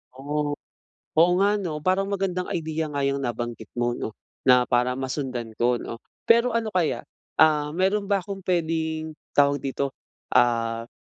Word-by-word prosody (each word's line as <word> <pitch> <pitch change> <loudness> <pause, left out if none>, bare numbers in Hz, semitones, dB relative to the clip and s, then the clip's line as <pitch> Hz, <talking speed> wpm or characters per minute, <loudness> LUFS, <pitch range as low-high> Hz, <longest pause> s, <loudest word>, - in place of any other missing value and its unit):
Oh, 145 +2 -2 0.6
oo 170 +3 +5
nga 205 +1 +3
no? 170 -6 -3
Parang 190 +2 +2
magandang 190 -2 -1
idea 160 -1 -2
nga 140 -1 -2
iyang 140 0 0
nabanggit 120 -2 -4
mo 120 0 +1
'no 110 -2 -5 0.3
na 125 -1 +7
para 125 0 +2
masundan 130 -3 -3
ko 120 +1 +3
'no 115 0 -7 0.3
pero 235 +2 +5
ano 225 -2 -1
kaya, 175 -4 0 0.3
ah 150 -2 +4
meron 195 +2 +1
ba 200 -2 +2
akong 195 -1 -6
puwedeng 160 -3 -1 0.2
tawag 145 -1 +4
dito, 135 0 -2 0.4
ah 115 -1 +2
150 Hz, 150 wpm, -25 LUFS, 125-185 Hz, 0.6 s, na